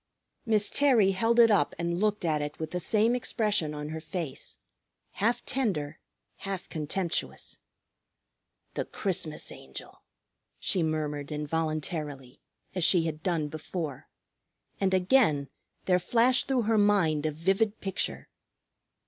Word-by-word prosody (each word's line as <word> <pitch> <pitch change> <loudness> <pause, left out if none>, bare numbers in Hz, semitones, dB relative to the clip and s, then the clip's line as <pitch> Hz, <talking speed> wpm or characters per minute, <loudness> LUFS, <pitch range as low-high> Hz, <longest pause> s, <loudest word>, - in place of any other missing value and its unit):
Miss 210 -2 +3
Terry 245 -9 +4
held 225 +5 +2
it 230 -1 +8
up 205 - +2
and 170 0 -1
looked 210 -2 +1
at 155 -2 +1
it 145 0 -4
with 160 - -5
the 180 - -2
same 220 +6 +2
expression 210 -10 0
on 150 0 -5
her 160 0 -5
face, 160 -4 -5 0.5
half 235 +4 0
tender, 170 - -1 0.4
half 195 -2 -5
contemptuous. 170 +3 -3 1.1
"The - - -2
Christmas 170 -6 -1
Angel!" 65 0 -10 0.6
she 185 - +1
murmured 150 -2 -2
involuntarily, 150 -3 -3 0.3
as 185 -2 0
she 175 0 +5
had 155 -1 -3
done 165 -4 0
before. 155 -1 -5 0.7
And 195 -1 +2
again 180 - +3 0.4
there 180 -1 +3
flashed 240 +7 +2
through 260 -3 +1
her 220 0 +2
mind 170 -8 +3
a - - -1
vivid 195 +7 0
picture. 195 -1 -3
175 Hz, 130 wpm, -29 LUFS, 155-210 Hz, 1.1 s, it